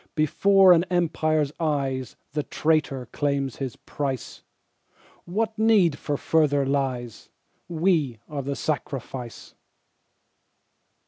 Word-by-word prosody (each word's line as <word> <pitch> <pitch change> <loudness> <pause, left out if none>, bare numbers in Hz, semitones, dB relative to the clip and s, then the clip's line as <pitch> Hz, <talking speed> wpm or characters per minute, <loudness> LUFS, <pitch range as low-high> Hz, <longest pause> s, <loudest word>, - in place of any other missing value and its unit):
Before 190 +5 +5
an 170 -1 +4
Empire's 155 -4 +1
eyes 135 -6 -1 0.2
The 150 - 0
traitor 150 -4 0
claims 140 -3 -1
his 135 -3 -4
price. 135 -4 -5 0.8
What 220 +4 -2
need 215 -7 +4 0.2
of 145 - 0
further 145 -3 +2
lies? 130 -4 -2 0.4
We 160 -7 +1
are 145 -2 -4
the 140 +1 -3
sacrifice. 135 -5 -5
150 Hz, 100 wpm, -25 LUFS, 135-165 Hz, 0.8 s, Before